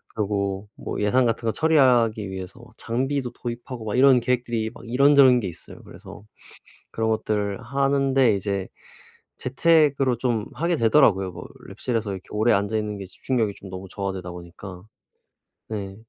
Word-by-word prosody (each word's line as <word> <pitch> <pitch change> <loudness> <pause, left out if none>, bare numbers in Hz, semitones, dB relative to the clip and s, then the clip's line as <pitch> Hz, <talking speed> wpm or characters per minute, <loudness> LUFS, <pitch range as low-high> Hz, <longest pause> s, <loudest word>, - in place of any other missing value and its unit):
그리고 100 -1 -2
뭐 - - -6
예산 125 +5 +3
같은 115 0 -1
거 - - +3
처리하기 125 -9 +3
위해서 95 -1 -8
장비도 130 +2 -2
도입하고 120 -1 -7
막 105 - -2
이런 130 -1 +6
계획들이 120 -3 -1
막 120 - -14
이런저런 135 0 +5
게 100 - -3
있어요. 85 - -10
그래서 100 - -12 0.7
그런 110 0 -1
것들을 105 -2 -1
하는데 135 -3 +2
이제 100 -1 -3 0.7
재택으로 140 -2 +2
좀 120 -4 -1
하게 170 +1 0
되더라고요. 110 -7 +3
뭐 - - -9 0.3
랩실에서 115 -4 -3
이렇게 95 -1 -8
오래 110 +3 +2
앉아 100 +2 +1
있는 105 -1 -3
게 95 - -7
집중력이 110 +1 -2
좀 100 - -11
너무 95 0 -8
저하되다 95 -3 -4
보니까. 90 +1 -10 0.9
네 100 -3 -5
110 Hz, 350 characters per minute, -24 LUFS, 100-130 Hz, 0.9 s, 이런